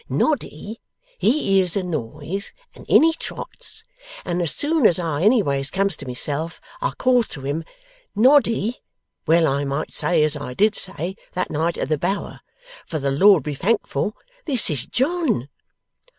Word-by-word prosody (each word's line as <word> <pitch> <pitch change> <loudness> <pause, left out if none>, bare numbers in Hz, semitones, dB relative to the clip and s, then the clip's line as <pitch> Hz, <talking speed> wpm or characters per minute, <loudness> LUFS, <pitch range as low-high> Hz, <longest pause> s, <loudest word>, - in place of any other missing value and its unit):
Noddy, 225 - -2 0.4
he 235 -6 +2
hears 180 -3 +5
a 195 - -1
noise, 155 - -5 0.2
and - - -15
in - - +7
he 325 0 +4
trots, - - -7 0.4
and 175 0 -1
as 170 - +2
soon 295 -4 +3
as 170 - +2
I 165 -4 -2
anyways 160 - +3
comes 195 +1 0
to 140 - -9
myself 145 +6 -3 0.2
I - - +1
calls 250 -3 +3
to 135 - -7
him, 145 +4 -3 0.5
"Noddy, 235 -1 +3 0.5
well 165 +1 +4
I 140 -1 0
might 140 +2 -3
say 175 -3 +2
as 155 0 +1
I 135 -4 -6
did 210 +5 +3
say, 190 -1 -4 0.2
that 180 - -2
night 165 +3 -1
at - - -2
the 155 -2 0
Bower, 195 +5 -3 0.5
for 160 - -3
the 140 -2 -1
Lord 185 +2 +5
be 150 - -3
thankful 210 +5 -1 0.3
this 255 - +2
is 140 -5 -3
John!" 270 - 0
175 Hz, 165 wpm, -22 LUFS, 150-220 Hz, 0.5 s, in